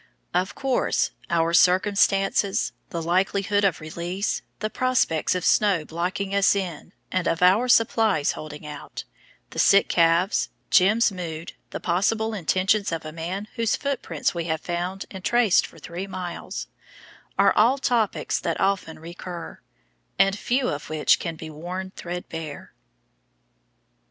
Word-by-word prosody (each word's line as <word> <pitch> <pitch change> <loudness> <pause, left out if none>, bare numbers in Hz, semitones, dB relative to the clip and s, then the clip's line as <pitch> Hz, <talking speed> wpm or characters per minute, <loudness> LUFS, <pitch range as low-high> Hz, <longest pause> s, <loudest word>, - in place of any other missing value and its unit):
Of 180 +2 0
course 270 -2 0 0.2
our 165 0 +1
circumstances, 195 +2 +3 0.2
the 170 -2 -4
likelihood 195 +4 +1
of 190 -6 +2
release, 170 +5 -3 0.2
the 215 0 -3
prospects 250 -12 +1
of 180 - -2
snow 195 -7 +3
blocking 180 +4 -3
us 200 0 +4
in 180 -4 -4 0.2
and 185 -1 0
of 165 +2 +1
our 200 +7 +5
supplies 220 -9 +3
holding 150 0 -8
out, 150 -1 -8 0.5
the - - -5
sick 200 - +5
calves, 170 +3 +3 0.2
"Jim's" 215 +4 +5
mood, 170 -3 -6 0.2
the - - -5
possible 220 +5 0
intentions 195 +2 +1
of 165 -1 -4
a 155 - -5
man 175 +6 -5
whose 230 -2 +1
footprints 265 - -2
we 170 -2 -3
have 160 -2 -2
found 180 +3 -3
and 190 -2 -8
traced 240 -4 +3
for - - -17
three 180 +3 -6
miles, 180 -2 -5 0.7
are - - +5
all 235 +6 +4
topics 240 -6 0
that - - -2
often 195 -4 0
recur, 170 +1 -8 0.6
and 195 0 +4
few 250 +5 0
of 145 0 -5
which 155 -1 +3
can 165 -2 -4
be 160 0 -8
worn 180 +5 -6
threadbare. 165 -4 -7
185 Hz, 140 wpm, -24 LUFS, 165-200 Hz, 0.7 s, our